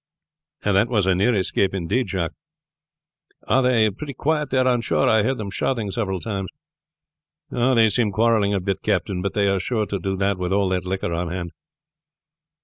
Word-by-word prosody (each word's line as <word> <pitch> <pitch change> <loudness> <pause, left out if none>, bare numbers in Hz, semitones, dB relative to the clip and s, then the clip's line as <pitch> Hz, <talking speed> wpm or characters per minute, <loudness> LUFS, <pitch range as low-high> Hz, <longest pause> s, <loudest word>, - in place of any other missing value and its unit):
"That 105 +2 +3
was 105 -6 +2
a 95 - +3
near 105 +6 +2
escape 95 0 0
indeed, 100 +6 -1
Jacques. 90 -3 -2 1.1
Are 135 - +3
they 115 -4 +3
pretty 140 +6 -8
quiet 150 +2 0
there 130 -1 +2
on 125 -2 +2
shore? 80 -9 +1
I 110 -1 +4
heard 130 +5 0
them 100 -2 -5
shouting 110 -2 -1
several 95 -4 -2
times." 100 -1 -4 1.0
"They 120 -2 +3
seem 110 -1 +1
quarreling 105 -1 +2
a - - +1
bit, 95 +1 -2
captain; 90 -2 -1
but 100 +1 -3
they 100 -1 +2
are 100 -1 +1
sure 110 +2 -1
to 100 -1 -3
do 95 +2 -2
that 100 0 0
with 90 0 -2
all 100 -1 +2
that 90 -1 -1
liquor 95 -2 -2
on 85 0 -2
hand." 85 -1 -4
100 Hz, 185 wpm, -22 LUFS, 95-115 Hz, 1.1 s, I